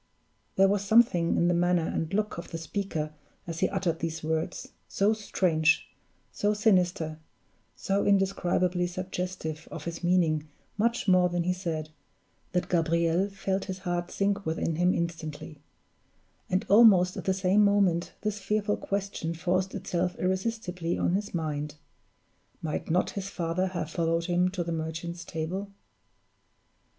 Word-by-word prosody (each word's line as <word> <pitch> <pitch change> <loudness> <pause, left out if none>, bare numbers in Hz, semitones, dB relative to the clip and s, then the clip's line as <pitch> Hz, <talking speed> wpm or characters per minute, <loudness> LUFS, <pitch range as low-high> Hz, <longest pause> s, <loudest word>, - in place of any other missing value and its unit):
There 195 0 +6
was 200 0 +1
something 200 -5 +4
in 170 - +3
the 175 - +3
manner 175 -1 +2
and 160 0 -2
look 210 -2 -1
of - - -8
the 165 - -4
speaker 165 -3 -3 0.3
as 165 -1 -5
he - - +2
uttered 185 -4 -1
these 165 -1 -3
words, 160 +2 -2 0.2
so 205 +2 +2
strange, 165 -6 +1 0.4
so 210 +1 0
sinister, 180 -7 +2 0.6
so 195 +1 0
indescribably 180 -2 +2
suggestive 180 -3 -4
of - - -7
his 170 +1 -5
meaning 165 -4 +2 0.3
much 230 +1 0
more 180 -1 +5
than 175 0 0
he 180 +1 +1
said, 165 -4 -4 0.6
that 180 0 0
Gabriel 170 +2 +2
felt 195 -1 -2
his 190 -1 -4
heart 175 -2 -2
sink 200 0 0
within 160 -1 -1
him 180 +1 +3
instantly; 160 -3 -4 0.9
and 185 +1 +1
almost 200 -4 +6
at - - -6
the 190 - +2
same 190 +2 +3
moment 195 -4 +2
this 210 0 -2
fearful 205 +1 0
question 195 -4 -3
forced 185 +2 0
itself 180 -2 -1
irresistibly 185 -2 -1
on - - +1
his 205 +2 -1
mind: 150 -2 -3 0.8
might 155 -2 -4
not 175 +3 +2
his 200 -1 -5
father 175 +1 -1
have 175 -4 -4
followed 165 0 0
him 180 +1 +2
to 185 -2 -3
the 170 - -4
Merchant's 165 +2 -4
Table? 175 +5 -4
180 Hz, 145 wpm, -28 LUFS, 165-195 Hz, 0.9 s, There